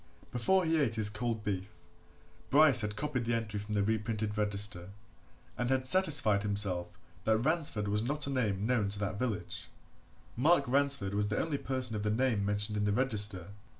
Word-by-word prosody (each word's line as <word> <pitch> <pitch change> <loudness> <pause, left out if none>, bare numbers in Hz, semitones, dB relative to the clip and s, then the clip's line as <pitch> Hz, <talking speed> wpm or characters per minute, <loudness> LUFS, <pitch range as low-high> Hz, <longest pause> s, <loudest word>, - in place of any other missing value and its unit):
Before 185 +10 +1
he 160 0 +1
ate 115 -5 0
his 105 -2 -1
cold 115 0 -3
beef, 95 -1 -3 0.8
Bryce 145 -4 +6
had 105 -1 -2
copied 135 -1 -3
the 115 0 0
entry 105 -2 -3
from 105 +1 -5
the 100 - +1
reprinted 110 0 -2
register, 105 -3 -2 0.7
and 120 0 -1
had 130 -1 0
satisfied 135 - +4
himself 100 -4 +2 0.3
that 110 0 +2
Ransford 135 -5 0
was 105 +1 0
not 145 +5 -1
a 140 - -3
name 105 -7 -1
known 115 -4 +1
to 100 +1 -1
that 100 0 -4
village 110 -5 -4 0.7
Mark 150 +5 +3
Ransford 140 -6 +1
was 105 0 0
the 105 - -2
only 150 -3 -2
person 130 -4 -1
of 105 - -3
the 105 - -1
name 115 -2 0
mentioned 105 +1 +1
in 105 - 0
the 105 - +1
register. 105 -6 -1
110 Hz, 185 wpm, -31 LUFS, 105-130 Hz, 0.8 s, Bryce